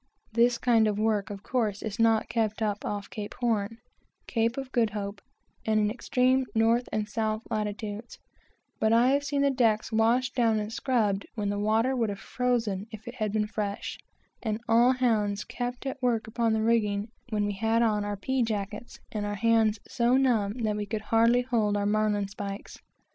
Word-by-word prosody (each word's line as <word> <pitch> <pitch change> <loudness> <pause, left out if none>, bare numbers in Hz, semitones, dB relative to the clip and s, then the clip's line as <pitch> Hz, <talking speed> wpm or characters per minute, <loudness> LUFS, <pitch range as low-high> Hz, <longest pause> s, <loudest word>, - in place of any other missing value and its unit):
This 235 +1 +4
kind 230 -3 +3
of 210 -1 0
work, 215 -1 +1
of 200 -1 -7
course, 220 -6 -1
is 215 -1 -5
not 225 -1 +3
kept 225 -1 -1
up 210 -1 -1
off 205 -1 -3
Cape 210 -1 -6
Horn, 230 -2 -1 0.5
Cape 230 +1 0
of 270 -1 -5
Good 235 -4 +2
Hope, 200 -1 -5 0.4
and 215 -1 +2
in 210 0 +2
extreme 255 +2 +1
north 230 +2 +2
and 210 -1 -1
south 215 0 -2
latitudes; 210 +1 -4 0.6
but 220 - +2
I 235 +2 +5
have 285 +1 +2
seen 285 -1 0
the 280 - +3
decks 225 -4 +1
washed 235 +3 +2
down 230 -3 +2
and 210 +1 -4
scrubbed, 215 -7 0
when 205 -2 -1
the 205 0 -1
water 220 +5 +2
would 230 -4 0
have 200 - -4
frozen 225 -6 -1
if 220 0 -10
it 240 - -5
had 215 -5 -2
been 210 0 +1
fresh; 210 -2 -4 0.4
and 220 -2 -2
all 240 +3 +5
hands 215 -5 +1
kept 245 +1 -5
at 270 0 -4
work 240 -3 +1
upon 225 0 0
the 220 0 +1
rigging, 215 -2 +1 0.2
when 210 -2 0
we 205 - -1
had 225 +3 +1
on 210 -2 +1
our 205 0 -3
pea 260 +6 -1
jackets, 210 0 -3
and 210 -1 -3
our 205 0 -2
hands 225 0 +3
so 240 +2 +2
numb 230 -7 +2
that 210 -1 +1
we 205 -1 -3
could 215 +1 -3
hardly 230 +3 +3
hold 220 -5 +1
our 205 - 0
marline 210 -1 +1
spikes. 200 0 -7
220 Hz, 190 wpm, -28 LUFS, 210-240 Hz, 0.6 s, I